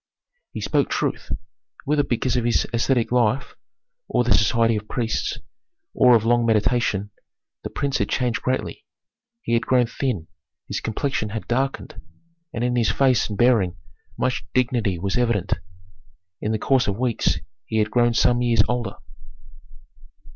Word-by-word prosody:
He - - -6
spoke - - +1
truth. - - -2 0.6
Whether 150 0 +2
because 125 -2 -1
of 125 - +1
ascetic 120 +1 +1
life, 125 +1 +1 0.5
or 125 - +1
the 120 - +3
society 115 +1 +3
of 105 0 -4
priests, 115 0 -2 0.6
or 125 -1 +6
of 110 -1 +2
long 120 +1 +3
meditation, 110 -2 +1 0.5
the - - -4
prince 140 0 -1
had - - 0
changed 125 -3 0
greatly. 130 0 -2 0.6
He - - -2
had 115 - +1
grown 125 -1 +4
thin, 115 - -3 0.4
his - - -3
complexion 110 -1 -2
had 110 +1 -6
darkened, 135 +3 -2 0.5
and 115 - -3
in 125 0 0
his 120 -2 +2
face 130 -5 +2
and 105 - -5
bearing 115 -7 +3 0.4
much 130 -2 -1
dignity 120 -7 +1
was 100 +7 -1
evident. 110 -6 +1 0.9
In 105 - -1
the 110 - +1
course 130 +3 +2
of 100 -1 -1
weeks 120 -2 0 0.3
he 110 - -2
had 105 -1 +1
grown 120 -1 +2
some 120 +2 +3
years 115 -3 +3
older. 125 -1 -2
120 Hz, 150 wpm, -23 LUFS, 110-125 Hz, 0.9 s, or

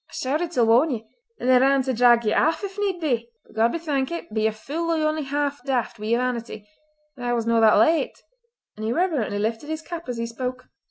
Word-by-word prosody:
I - - -20
shouted 305 +6 -1
till 250 -9 +2
warn 240 +8 +4
ye, 230 -5 -4 0.3
and - - -3
then 255 -1 +6
ran 270 0 +4
to 260 0 -1
drag 240 -1 +4
ye 215 - +2
aff, 325 +5 +2
if 390 -1 -5
need 390 -3 -1
be. 240 -8 -1 0.2
But - - -20
God 225 +1 +3
be - - -2
thankit, 295 -4 -3
be 220 - 0
ye 220 - +3
fule 295 +10 -4
or 310 - +2
only 310 0 -1
half 285 -1 -2
daft 250 -4 -2
wi' 215 - -5
yer 235 +1 +2
vanity, 235 -4 -3 0.5
that 245 -1 -5
I 240 - +1
was 230 -2 -1
no 230 0 +3
that 220 -1 +6
late!" 325 0 +2 0.6
and 215 - -8
he 220 - -1
reverently 295 - 0
lifted 225 +7 -2
his 315 0 -4
cap 335 -5 -7
as 245 - -3
he 230 - -2
spoke. 250 +2 -5
255 Hz, 240 wpm, -24 LUFS, 230-310 Hz, 0.6 s, then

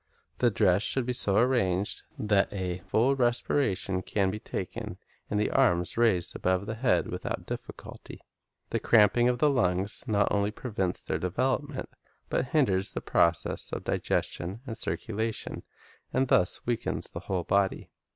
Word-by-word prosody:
The 120 - +3
dress 95 -3 +3
should 130 +3 +1
be 125 - -1
so 100 -5 +2
arranged 105 -6 +1 0.2
that 105 -2 +2
a 90 -2 -3
full 120 +8 +3
respiration 120 -6 0
can 95 0 0
be 105 - -5
taken, - - -5 0.3
and 105 - 0
the 105 - 0
arms 90 -10 +2
be 115 - -1
raised 95 -7 +2
above 95 +1 0
the 110 - -3
head 115 +3 +2
without - - -4
difficulty. - - -8 0.5
The - - 0
cramping 120 +2 +4
of 125 - 0
the 145 +3 +3
lungs 95 -5 0
not 105 -2 +2
only 100 0 +1
prevents 105 -5 -3
their - - -2
development, 130 - -1 0.4
but 125 - 0
hinders 100 -11 +1
the - - -3
processes 85 0 +1
of - - -4
digestion 95 +7 -2
and 115 -4 -5
circulation, 110 -1 -3 0.5
and 130 -1 +1
thus 90 - +3
weakens 120 -2 -2
the - - -5
whole 95 -2 -2
body. 100 +1 0
105 Hz, 155 wpm, -28 LUFS, 95-120 Hz, 0.5 s, cramping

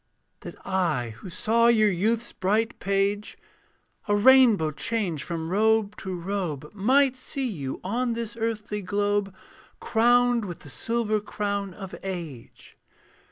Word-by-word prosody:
That - - -9
I 165 -11 0
who 190 - -9
saw 230 +6 +2
your 215 -3 +4
youth's 220 +6 -1
bright 215 +4 0
page, 200 +1 -1 0.7
A 205 - +2
rainbow 230 -7 +5
change 185 -2 -2
from 165 -1 -4
robe 215 +1 +2
to 190 -1 -5
robe, 170 -6 -4
Might 260 +6 +3
see 265 +1 -4
you 140 - -5
on 235 +5 -1
this 230 -1 -4
earthly 215 -2 -3
globe, 205 +1 0 0.5
Crowned 240 0 +3
with 175 -3 -7
the 145 - -10
silver 215 - -1
crown 200 -2 -3
of 195 -3 -9
age. 170 -10 -8
205 Hz, 130 wpm, -26 LUFS, 185-230 Hz, 0.7 s, rainbow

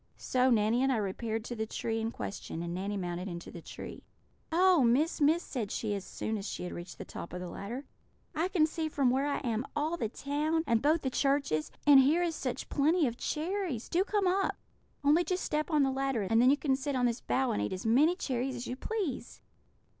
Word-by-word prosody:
So 255 0 +2
Nanny 225 +1 +3
and 270 0 +3
I 250 - +2
repaired 220 +2 -2
to 240 - -5
the 220 -1 -3
tree 225 +1 -2
in 225 - -1
question, 200 -6 -5
and 170 0 -4
Nanny 200 +3 -3
mounted 180 0 -3
into 170 -2 -7
the 170 - -9
tree. - - -8 0.5
"'Oh, 360 -1 +5
Miss! 285 +8 +2
Miss!' 315 +4 +4
said 230 -7 -4
she 215 0 -2
as 200 -2 -3
soon 220 +2 -3
as 195 - -5
she - - -5
had 180 - -5
reached 175 +1 -8
the - - -7
top 170 - -8
of 180 - -4
the 180 - -5
ladder, 235 +10 -6 0.5
'I 330 +2 0
can 365 -5 +3
see 320 0 -3
from 275 -4 +2
where 270 +3 +1
I 285 - 0
am 235 -2 -1
all 310 +3 0
the 225 - -2
town, 300 +6 -1
and 230 -1 +2
both 310 +3 +2
the 265 - -1
churches; 275 - +1
and 285 -2 +9
here 300 +7 +4
is 340 -2 0
such 255 -5 -4
plenty 310 +3 +2
of 240 -3 -1
cherries! 325 - -2
Do 355 +3 +2
come 410 -1 0
up! 380 +2 +1 0.5
Only 300 +5 +5
just 365 +2 -2
step 305 +2 -1
on 300 -3 +3
the 270 - +2
ladder, 270 -4 0
and 225 +4 +3
then 250 - +6
you 285 - +4
can 275 -3 +1
sit 275 +1 -3
on 250 -1 +2
this 240 0 0
bough 260 -1 +1
and 100 - -1
eat 105 - -1
as 185 - -5
many 285 +10 +4
cherries 260 -5 -2
as 245 0 -5
you 250 - -4
please.'" 385 - -4
265 Hz, 235 wpm, -31 LUFS, 220-310 Hz, 0.5 s, and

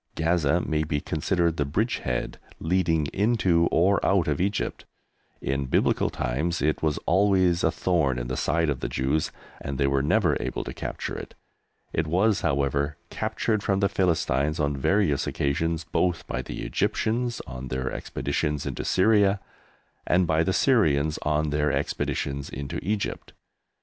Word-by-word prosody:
Gaza 80 -1 +2
may 80 -2 0
be 75 -1 -1
considered 85 +3 0
the 75 - +2
bridgehead 70 - -2 0.2
leading 80 -3 +1
into 95 -6 +2
or 95 +4 +3
out 95 -4 +2
of 75 +1 0
Egypt. 100 +2 -2 0.6
In 70 0 -1
Biblical - - +2
times 75 +9 -1
it 75 +1 0
was 75 -2 +1
always 95 -2 +3
a - - +4
thorn 80 -7 +1
in - - -3
the 65 +1 -3
side 80 -2 +1
of 70 - -3
the - - -3
Jews, 70 +4 0 0.3
and 70 -1 -4
they 70 - +2
were 70 0 +2
never 75 +1 +2
able - - -3
to - - -6
capture - - -5
it. - - -8 0.6
It 80 0 0
was, 100 +6 +2
however, 70 -2 0
captured 110 0 -1
from 95 -1 +1
the 100 -1 +2
Philistines 75 -4 +1
on 70 -1 +1
various 75 0 +1
occasions 80 +4 -1
both 85 +1 0
by - - -3
the - - -6
Egyptians 120 +2 -1
on 65 +1 -7
their 65 0 -2
expeditions 75 -1 -2
into - - -3
Syria 100 0 +3 0.7
and 90 +2 +3
by 80 -1 +2
the 85 - +1
Syrians 80 - +2
on 75 0 0
their 75 0 +1
expeditions 70 0 -2
into 70 0 -5
Egypt. 105 +2 -3
80 Hz, 155 wpm, -26 LUFS, 70-95 Hz, 0.7 s, a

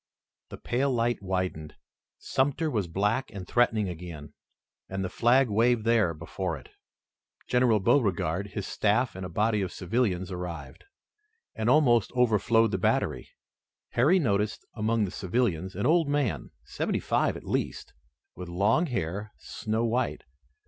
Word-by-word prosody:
The - - -8
pale 135 +3 0
light 120 -1 0
widened. 90 -5 -3 0.4
Sumter 145 +4 0
was 105 -7 -1
black 105 +9 0
and 95 -2 -8
threatening 110 -4 +2
again, 85 -4 -8 0.6
and 95 0 -3
the - - -3
flag 125 +3 +4
waved 115 +1 +2
there 110 -8 +3
before 80 +1 -4
it. - - -15 0.8
General 125 -3 +3
Beauregard, 95 - +1
his 100 -1 -5
staff 110 +4 +1
and 95 - -6
a 90 - -5
body 105 +3 +1
of 95 - -2
civilians 95 -2 -1
arrived, 90 -5 -7 0.7
and 110 +1 -1
almost 125 -6 +4
overflowed 115 -2 +3
the 95 - -1
battery. - - 0 0.6
Harry 145 +10 +4
noticed 105 - 0
among 110 0 +1
the 90 - -5
civilians 95 -3 -1
an 100 - -2
old 165 -1 +3
man, 145 -5 -1
seventy - - -2
five - - 0
at - - -11
least, - - -3 0.4
with 90 0 -8
long 105 - +2
hair, 105 - -3
snow 110 +2 -3
white. 120 +3 -1
105 Hz, 140 wpm, -28 LUFS, 95-120 Hz, 0.8 s, flag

